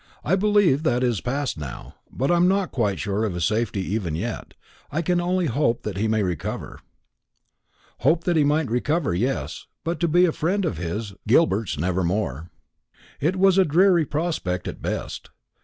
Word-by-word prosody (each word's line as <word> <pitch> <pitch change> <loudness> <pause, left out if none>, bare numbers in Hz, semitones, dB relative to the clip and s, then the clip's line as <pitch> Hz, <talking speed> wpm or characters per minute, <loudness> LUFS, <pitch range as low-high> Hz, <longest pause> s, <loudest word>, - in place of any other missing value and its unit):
I 180 - +2
believe 205 -7 +3
that 130 -6 +1
is 120 -5 0
past 135 - -2
now; 70 -5 -8 0.2
but 135 +5 0
I - - +4
am 175 +1 +4
not 195 0 +1
quite 105 -6 0
sure 105 +1 -1
of 105 -5 -1
his 85 -2 0
safety 105 0 0
even 90 -8 -2
yet. - - -5 0.4
I 160 +4 -1
can 175 +1 +1
only 180 +1 0
hope 125 -3 0
that 105 -3 -4
he 105 +3 0
may 110 -1 +1
recover." 90 -5 -4 1.2
Hope 160 +7 +2
that 175 -1 +1
he 155 - +4
might 150 +1 +2
recover, 145 - 0
yes; 125 +10 -2 0.2
but 170 +1 -2
to 170 - +2
be 175 +3 +4
a 170 - +2
friend 185 +6 0
of 105 - -2
his, 100 +5 -4
Gilbert's, 110 - +2
never 90 +4 0
more. 85 -4 -2 0.7
It 165 +7 +1
was 190 0 +4
a - - +7
dreary 175 0 +4
prospect 145 - -2
at - - -6
best. - - -4
135 Hz, 185 wpm, -24 LUFS, -, 1.2 s, a